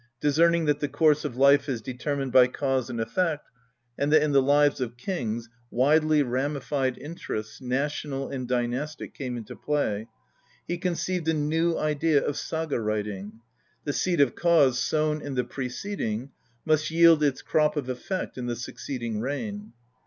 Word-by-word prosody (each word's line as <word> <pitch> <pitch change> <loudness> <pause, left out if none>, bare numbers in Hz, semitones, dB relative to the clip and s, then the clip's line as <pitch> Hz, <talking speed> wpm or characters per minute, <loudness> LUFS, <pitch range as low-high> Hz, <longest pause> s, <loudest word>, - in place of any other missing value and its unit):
Discerning 165 +3 +3
that 150 -1 +2
the 145 - -1
course 150 0 +3
of 120 - -4
life 140 +2 +5
is 125 -4 -1
determined 130 +3 -3
by 125 0 +7
cause 130 -1 -1
and 120 - -4
effect, 150 +7 -1 0.5
and 145 +1 +1
that 155 -1 +6
in 150 - +1
the 140 -1 +5
lives 145 0 +3
of 120 -1 -3
kings 120 - -3 0.2
widely 150 +3 +3
ramified 135 0 -1
interests, 135 -9 -6
national 135 +2 -2
and 130 -2 -4
dynastic, 125 +5 -2
come 125 -3 -4
into 115 -3 -8
play, 115 -8 -1 0.6
he 175 0 -2
conceived 180 -1 -2
a 160 - +2
new 160 +3 +1
idea 155 0 +2
of 145 - -1
saga 160 -4 -2
writing: 105 0 -3 0.4
the 145 - -2
seed 170 +5 0
of 140 -4 +4
cause 150 -8 +3
sown 155 +2 0
in 140 -2 -5
the 125 - +1
preceding 125 - -4 0.3
must 155 0 +2
yield 165 -1 +6
its 140 -3 0
crop 150 0 +2
of 140 -4 -2
effect 130 +5 -4
in 120 - -4
the 120 - -1
succeeding 120 -1 -5
reign. 205 - -4
140 Hz, 160 wpm, -26 LUFS, 125-155 Hz, 0.6 s, by